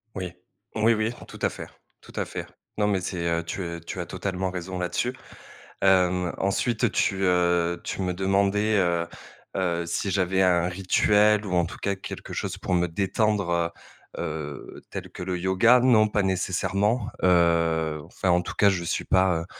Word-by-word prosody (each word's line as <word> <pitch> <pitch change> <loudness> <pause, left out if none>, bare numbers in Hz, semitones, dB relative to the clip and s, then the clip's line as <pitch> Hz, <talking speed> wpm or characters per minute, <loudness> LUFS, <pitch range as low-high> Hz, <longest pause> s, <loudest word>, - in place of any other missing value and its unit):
Oui, 90 -2 -4 0.4
oui 110 +1 +4
oui, 110 +1 0 0.2
tout - - -11
à - - +2
fait, - - -8 0.4
tout - - -15
à - - -1
fait. - - -6 0.3
Non 105 -1 +2
mais 100 -2 +1
c'est 90 -2 -3
heu, 85 0 0
tu, 90 - -5
heu, 85 -1 -4
tu 85 +2 -7
as 85 - -3
totalement 95 0 -3
raison 90 0 -5
là-dessus. 90 +8 -1 0.7
Hem, 90 -2 +3
ensuite 110 +4 0
tu, 95 -1 0
heu, 85 -1 +2
tu - - -4
me 90 -1 -1
demandais, 100 +3 +1
heu 85 -3 +1 0.5
heu, 85 -3 0
si 95 +3 -1
j'avais 95 0 +2
un 90 -1 +3
rituel, 105 +3 +3
ou 95 - -3
en 85 -1 +3
tout 90 - -8
cas 100 -1 0
quelque 95 - -8
chose - - -3
pour 90 - -1
me 90 0 +2
détendre, 100 +2 0
heu 85 -1 +1 0.5
heu, 75 -3 -6
tel - - -6
que - - -9
le 90 0 -2
yoga. 95 +7 +5
Non 120 -4 +5
pas 105 0 0
nécessairement, 95 +4 0
heu, 85 -3 +3
enfin 90 +2 -3
en 90 0 +4
tout - - -6
cas 100 - +5
je 90 -3 -1
suis 85 - -2
pas, 95 -2 +3
heu, - - -7
95 Hz, 185 wpm, -25 LUFS, 85-100 Hz, 0.7 s, yoga